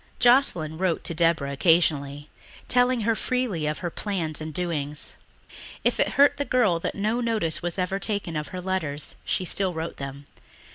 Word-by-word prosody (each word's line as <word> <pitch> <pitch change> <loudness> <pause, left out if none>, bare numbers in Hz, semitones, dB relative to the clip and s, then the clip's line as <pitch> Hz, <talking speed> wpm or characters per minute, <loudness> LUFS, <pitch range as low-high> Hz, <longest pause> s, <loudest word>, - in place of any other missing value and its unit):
Joscelyn 210 - +3
wrote 185 -3 0
to - - -2
Deborah 165 -4 +1
occasionally, 145 -2 +2 0.4
telling 250 -1 +3
her 225 +2 +2
freely 225 - -1
of 150 - -2
her 175 - -2
plans 165 -7 -2
and 155 0 -5
doings. 150 -3 -2 0.7
If - - +1
it - - +2
hurt 285 +1 +6
the 285 - 0
girl 225 -11 +2
that - - -3
no 215 +4 0
notice 220 -9 0
was 175 +1 -3
ever 190 +1 -1
taken 200 -6 -2
of 150 0 -3
her 185 - -6
letters 160 -6 -2
she 185 - -1
still 185 0 +1
wrote 160 +1 -4
them. 140 +1 -7
175 Hz, 175 wpm, -25 LUFS, 155-210 Hz, 0.7 s, hurt